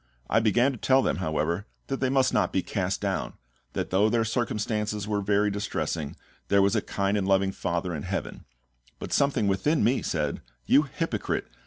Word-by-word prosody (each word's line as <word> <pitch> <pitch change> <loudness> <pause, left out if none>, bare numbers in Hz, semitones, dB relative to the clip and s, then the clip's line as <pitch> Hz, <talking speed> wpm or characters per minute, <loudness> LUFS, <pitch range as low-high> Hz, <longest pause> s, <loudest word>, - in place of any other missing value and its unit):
I - - +5
began 120 +5 +3
to 125 - -8
tell 130 +3 +4
them, - - 0
however, 85 +3 -1 0.2
that 135 - -3
they 130 - +1
must 130 -1 +2
not - - +2
be - - 0
cast - - -2
down, - - -2 0.4
that - - -3
though 100 +4 +4
their 115 0 +2
circumstances 105 -2 -1
were 105 -1 0
very 105 +1 +2
distressing, 95 -7 -3 0.3
there 100 - +4
was 100 +3 +2
a 110 - +2
kind 100 0 -1
and 95 - -2
loving 95 0 +3
FATHER 85 -1 -2
in 75 - -4
heaven; - - -4 0.5
but - - -6
something 140 -7 +2
within 105 - +2
me 125 +5 +2
said, 75 -4 -2 0.2
"You 140 - +6
hypocrite! 150 -9 -2
105 Hz, 185 wpm, -27 LUFS, 95-120 Hz, 0.5 s, You